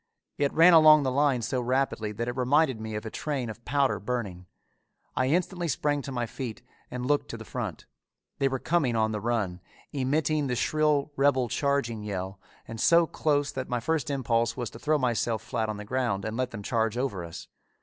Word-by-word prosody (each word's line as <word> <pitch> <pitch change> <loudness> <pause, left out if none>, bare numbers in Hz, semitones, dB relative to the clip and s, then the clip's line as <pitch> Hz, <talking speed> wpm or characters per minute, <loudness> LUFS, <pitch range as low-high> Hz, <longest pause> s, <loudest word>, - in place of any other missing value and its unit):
It 140 -1 +2
ran 170 +2 +7
along 155 -2 +8
the 130 - 0
line 135 -3 +2
so 125 +3 -1
rapidly 125 -3 0
that 115 +3 -3
it 120 - -3
reminded 130 -1 +2
me 110 -1 -5
of 105 - -5
a 110 - -5
train 135 -7 -3
of 115 +2 -13
powder 135 -7 +1
burning. 100 -6 -4 0.7
I 130 - +1
instantly 175 +3 0
sprang 145 0 0
to 135 - -7
my 120 -2 -1
feet 120 -1 -6 0.3
and 125 0 -4
looked 145 +2 +1
to - - -5
the - - -10
front. - - -5 0.5
They 135 - +3
were 135 0 -1
coming 140 -4 +1
on 110 -1 +2
the 105 - -2
run, 100 -6 -1 0.3
emitting 145 +2 0
the 125 - -1
shrill 150 +2 +1
rebel 135 -3 +2
charging 140 -6 0
yell, 95 -2 -5 0.3
and 115 -1 -6
so 170 0 +5
close 145 -3 0
that 130 -1 -5
my 125 - 0
first 160 +5 -1
impulse 115 -4 0
was 120 -3 -3
to 115 - -11
throw 155 +3 +2
myself 120 -4 0
flat 115 -3 -2
on 105 - -3
the 105 - -7
ground 115 -4 -1
and 110 0 -3
let 130 +1 -1
them 105 -3 -8
charge 115 0 0
over 125 -9 -2
us. 85 -1 -9
125 Hz, 205 wpm, -27 LUFS, 110-145 Hz, 0.7 s, along